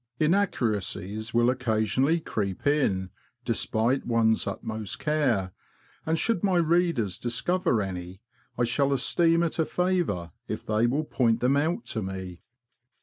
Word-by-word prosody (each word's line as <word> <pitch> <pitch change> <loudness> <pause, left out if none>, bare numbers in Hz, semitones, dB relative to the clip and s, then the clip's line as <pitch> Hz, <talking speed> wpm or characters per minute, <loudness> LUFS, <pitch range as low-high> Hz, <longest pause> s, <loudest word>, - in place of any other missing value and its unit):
Inaccuracies 110 - 0
will 120 +1 +3
occasionally 125 +5 +1
creep 100 - -4
in, 100 -11 +1 0.3
despite 115 +5 +1
one's 115 -2 +2
utmost 110 -3 -4
care, 130 -12 0 0.6
and 160 +1 +2
should 225 0 0
my 190 -3 +3
readers 165 - +1
discover 120 - 0
any, 90 -1 -6 0.4
I 120 - +2
shall 135 +4 +1
esteem 165 +5 +3
it 165 0 -2
a 160 - +3
favour 175 - -1 0.2
if - - -5
they 110 +2 +2
will 140 +6 0
point 115 -5 +1
them 125 +3 +2
out 160 +10 0
to 110 - -2
me. 95 -2 -6
120 Hz, 135 wpm, -27 LUFS, 105-160 Hz, 0.6 s, will